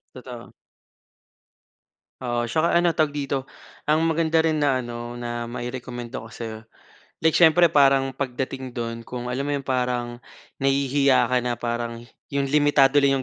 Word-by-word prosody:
Totoo. 125 -2 -10 1.7
Oo. 120 -2 -2
Tsaka 160 +4 +1
ano 175 0 +4
tawag 155 -3 +2
dito, 140 -2 -2 0.4
ang 155 +1 +2
maganda 160 0 +2
rin 160 -1 +1
na 140 -3 +2
ano, 120 0 -6
na 120 -1 -4
mai-rekomenda 120 0 -6
ko 115 - -8
sa‘yo, 110 -2 -7 0.6
like 160 - +5
siyempre, 170 +1 +5
parang 135 -3 +4
pagdating 130 -1 -4
do’n 115 -1 -5
kung 125 0 -5
alam 135 +3 -2
mo 145 - -1
‘yong 140 - -2
parang 125 -2 -1 0.4
nahihiya 135 0 +2
ka 125 - +3
na 125 0 -1
parang 120 0 -4 0.3
‘yong 140 -1 0
limitado 145 -1 +4
lang 135 -1 +3
130 Hz, 145 wpm, -24 LUFS, 120-145 Hz, 1.7 s, like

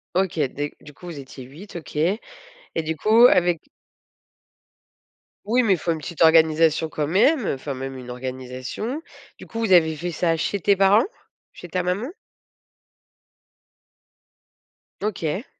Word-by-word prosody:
OK, 185 -3 0
des 145 +3 -5
du 150 - -13
coup 180 - -15
vous 160 -5 -7
étiez 130 -1 -10
8, 155 +12 -13
OK. 165 -3 -9
Et 175 +9 +1 0.6
du 160 +1 -2
coup 220 +9 +5
avec 175 -5 +2 1.8
Oui 245 +4 +2
mais 205 - +4
il 185 - +1
faut 170 - -1
une 160 - -2
petite 165 +2 -8
organisation 160 0 +4
quand 150 -2 -2
même, 225 - +3
heu, - - +1
enfin 135 +1 -5
même 135 +1 -6
une 125 -1 -10
organisation. 130 - -5 0.4
Du - - -12
coup 225 - -6
vous 225 -4 0
avez 160 -3 +5
fait 175 +3 -4
ça 165 0 +1
chez 195 +5 -2
tes 200 +3 +3
parents? 195 +3 +5 0.5
Chez 175 - -11
ta 180 +1 -1
maman? 185 +8 -1 2.9
OK. 190 - -2
165 Hz, 150 wpm, -23 LUFS, 150-195 Hz, 2.9 s, coup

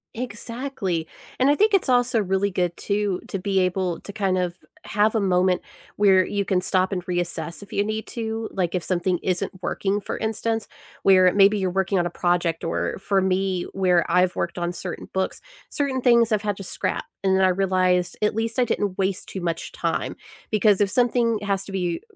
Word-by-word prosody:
Exactly, 230 -7 -4 0.3
and 260 +2 +4
I 290 - +5
think 425 +3 +3
it's 380 -8 +3
also 245 -2 +3
really 195 +1 0
good, 180 -2 -1
too, 200 -2 -1
to 195 - -3
be 195 0 0
able 180 -1 0
to 200 - -9
kind 195 -3 0
of 175 -1 -1 0.3
have 210 +2 +2
a 220 - +3
moment 185 -1 +2 0.3
where 190 -2 +5
you 200 +1 -2
can 185 -1 +1
stop 185 +1 +1
and 180 -2 -2
reassess 175 0 -3
if 200 - -13
you 200 - +2
need 215 +1 -3
to. 225 -1 -4
Like, 180 -2 -1
if 180 - -1
something 180 0 0
isn't 185 -2 -1
working, 200 +1 -1
for - - -4
instance, 225 0 -2 0.3
where 185 -1 +6
it 180 - +4
maybe 200 +1 +6
you're 190 -2 0
working 190 +1 0
on 175 - +2
a - - -2
project, 175 -2 0
or 165 - -2
for 195 -1 +1
me, 190 -1 0
where 180 -3 +3
I've 180 0 +3
worked 170 +1 -2
on 175 0 -1
certain 180 0 -7
books, 190 0 -2 0.3
certain 275 -3 -1
things 235 -2 +4
I've 210 0 +1
had 205 -2 -1
to 195 - -7
scrap, - - -3 0.2
and 190 0 +3
then 190 - +3
I 185 - +5
realized 185 -1 +1
at 210 0 +1
least 225 +2 -1
I 250 - +4
didn't 205 -4 -2
waste 190 -1 -1
too 190 - -5
much 170 -1 -3
time. - - -2 0.4
Because 210 -2 +4
if 200 -2 +2
something 235 -1 +2
has 195 -1 -1
to 200 - -9
be 175 -3 -2
195 Hz, 205 wpm, -24 LUFS, 180-215 Hz, 0.4 s, where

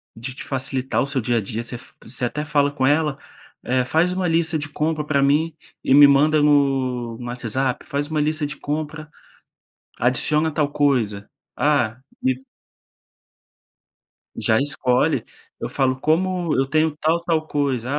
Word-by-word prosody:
de 125 +3 -7
te - - -7
facilitar 135 -1 -2
o - - +1
seu 135 -2 -1
dia 120 +1 0
a - - +1
dia, 110 +4 -4
você 120 +1 -6 0.3
você 125 - -4
até 150 +5 -3
fala 145 -1 +2
com 135 -2 -1
ela, 150 0 +2 0.5
eh, 125 0 +1
"Faz 165 +7 +2
uma 185 -1 -1
lista 165 -1 +1
de 150 -1 -5
compra 155 +1 -1
pra 145 -2 +1
mim 150 +3 +2 0.3
e 135 - +3
me 145 0 +9
manda 150 +2 +4
no 130 -5 +1
no 125 - -8
WhatsApp, 125 +2 -2
faz 145 +1 -2
uma 155 -1 -1
lista 155 0 0
de 145 +1 -6
compra, 155 +1 -4 0.9
adiciona 150 +6 +2
tal 150 -1 0
coisa. 120 -9 0 0.3
Ah, 125 -4 +1 0.2
me" 130 0 0 1.9
Já 110 - +2
escolhe, 130 -3 +1 0.3
eu - - -3
falo: 130 -1 0
"Como 175 +2 +1
eu 135 - +2
tenho 155 +2 +1
tal 160 +3 +1
tal 165 -2 0
coisa, 135 -4 -1
145 Hz, 160 wpm, -22 LUFS, 130-155 Hz, 1.9 s, me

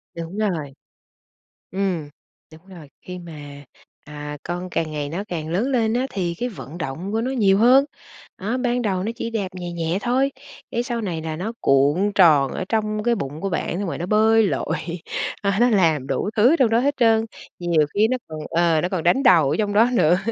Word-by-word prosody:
Đúng 170 +4 -6
rồi. 165 -10 -2 1.0
Ừm, 185 -6 -2 0.4
đúng 160 +4 -16
rồi, 170 -7 -12
khi 180 0 -8
mà, 145 -4 -10 0.4
à, 150 0 -7
con 175 +1 -5
càng 160 -1 -1
ngày 145 -1 -3
nó 185 +7 -4
càng 160 -3 -4
lớn 190 +9 0
lên 235 -4 +1
á, 255 +2 0
thì 175 -3 -2
cái 245 - -1
vận 155 - -9
động 175 +8 -5
của 225 - 0
nó 255 +3 -2
nhiều 200 -6 +3
hơn. 255 +5 +6 0.5
Á, 220 +6 -2
ban 245 -1 0
đầu 190 -5 -1
nó 220 +4 -2
chỉ 230 - -4
đạp 210 -4 -2
nhẹ 175 -1 -6
nhẹ 170 +1 -1
thôi 260 +5 +1 0.4
cái 235 - -1
sau 240 -2 -3
này 170 -7 -3
là 160 -1 -4
nó 200 +7 -4
cuộn 145 +9 +3
tròn 150 -8 +5
ở - - -3
trong 215 -1 -1
cái 240 +1 +2
bụng 150 -6 -5
của 195 - -2
bạn 175 0 -2
xong 200 - -2
rồi - - -4
nó 175 - -3
bơi 220 +2 +4
lội, - - -1 0.7
à 200 0 0
nó 245 - +5
làm 160 - +2
đủ 205 - -1
thứ 245 +10 +5
trong 245 -4 +3
đó 225 - +3
hết 280 +4 +1
trơn, 225 -2 +3 0.3
nhiều 170 -4 +2
khi 215 +2 +3
nó 255 - 0
còn 155 -1 -7
ờ, 165 -1 +2
nó 180 - -1
còn 185 -3 -2
đánh 260 +11 +3
đầu 165 - +5
ở 155 - 0
trong 205 -1 0
đó 225 +4 +4
nữa. 175 -5 +4
185 Hz, 215 wpm, -22 LUFS, 160-225 Hz, 1.0 s, hơn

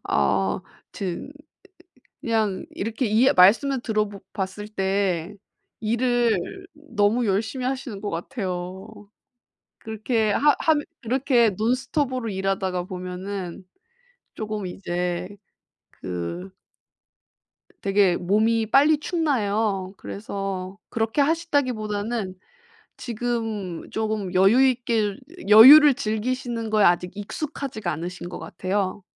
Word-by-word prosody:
아 70 - +1 0.3
튼 195 - -5 0.9
그냥 220 -4 -1
이렇게 225 +5 -3
이해 225 +5 +4
말씀을 240 +9 +5
들어 215 -3 -1
보 200 - -10
봤을 195 +2 -4
때 195 -3 -1 0.5
일을 235 -1 +1 0.4
너무 240 -6 0
열심히 220 +6 -1
하시는 255 -6 -4
것 210 - -3
같아요. 185 0 -6 0.7
그렇게 220 0 -1
하 295 +4 +4
하면 305 -2 +2 0.2
그렇게 245 -1 +2
논스톱으로 250 - -1
일하다가 190 -2 -1
보면은 185 0 -6 0.7
조금 215 -2 -4
이제 180 -1 -3 0.6
그 90 0 -6 1.3
되게 195 -2 +3
몸이 220 +5 +1
빨리 290 +2 +5
축나요. 215 - -1
그래서 195 -2 -5
그렇게 225 +5 0
하신다기보다는 240 - -1 0.6
지금 225 -6 -4
조금 215 -4 -2
여유 195 +7 +5
있게 230 -5 0 0.3
여유를 275 +7 +10
즐기시는 230 -1 -3
거에 215 -1 +3
아직 175 +1 +3
익숙하지가 220 - -4
않으신 175 +3 -6
것 - - -7
같아요. 190 +1 -3
215 Hz, 230 characters per minute, -24 LUFS, 190-240 Hz, 1.3 s, 여유를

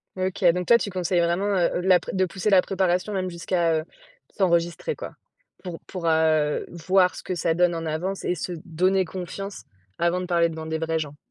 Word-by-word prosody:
OK. 190 +2 -3
Donc 180 0 -2
toi, 235 - +7
tu 215 - -3
conseilles 180 -1 0
vraiment, 170 +3 +1
heu, 175 -1 +1
de 180 - -3
la 185 -1 +6
pré - - -7
de 190 0 +2
pousser 185 +3 -2
la 190 -2 +6
préparation 185 +1 0
même 185 -1 -1
jusqu'à, 170 -1 0
heu, - - -5 0.5
s'enregistrer, 175 - +1
quoi, - - -8 0.5
pour 175 -3 -6
pour, 185 -3 -6
heu, 160 -2 +2
voir 180 +2 +2
ce - - -9
que 185 - -3
ça 165 -1 +1
donne 175 0 +2
en 165 0 -4
avance 175 +5 -3
et - - +1
se 180 +2 -4
donner 185 +3 +1
confiance 190 +3 -6 0.4
avant 170 +1 +1
de - - -4
parler 170 -2 +2
devant 160 -1 -7
des 160 0 -3
vrais 165 0 -1
gens. 145 -2 -5
175 Hz, 210 wpm, -24 LUFS, 165-185 Hz, 0.5 s, toi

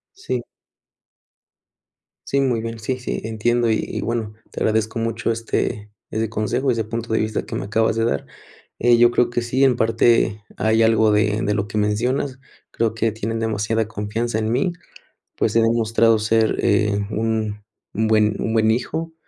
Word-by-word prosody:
Sí. 130 - -3 1.9
Sí, 140 - +1
muy 125 -4 +1
bien. 115 0 -5
Sí, 130 +4 -3
sí, 125 - -3
entiendo 115 +2 0
y 110 - +2
y - - -4
bueno, 115 -2 -2 0.2
te - - -6
agradezco 110 +1 0
mucho, 115 0 -1
este, 110 -2 -2 0.2
ese 110 0 -1
consejo, 120 +5 0
ese 115 -2 0
punto 115 +1 -5
de - - +2
vista 110 0 -2
que - - -6
me - - -3
acabas 110 +2 +1
de 115 0 +1
dar. 70 - -1 0.5
Eh, 120 -1 +5
yo 120 0 +6
creo 120 - +2
que 120 0 -1
sí, 125 +3 0
en 130 -2 +5
parte 115 -2 +2
hay 110 +1 +3
algo 110 -1 +4
de 105 +1 +2
de 105 - 0
lo 100 0 -1
que 105 - -4
mencionas. 125 +6 0 0.3
Creo 115 -1 0
que 115 0 0
tienen 110 +1 -3
demasiada 110 0 -1
confianza 110 +2 -2
en 110 0 -1
mí. 135 +9 +1 0.6
Pues, - - 0
he 115 - +5
demostrado 115 0 +3
ser, 110 +1 +2
eh, 100 0 +2
un 110 -1 -1 0.3
un 110 +1 0
buen 105 -1 +3
un 110 - -1
buen 110 -1 +3
hijo, 160 +8 -2
115 Hz, 175 wpm, -21 LUFS, 110-115 Hz, 1.9 s, yo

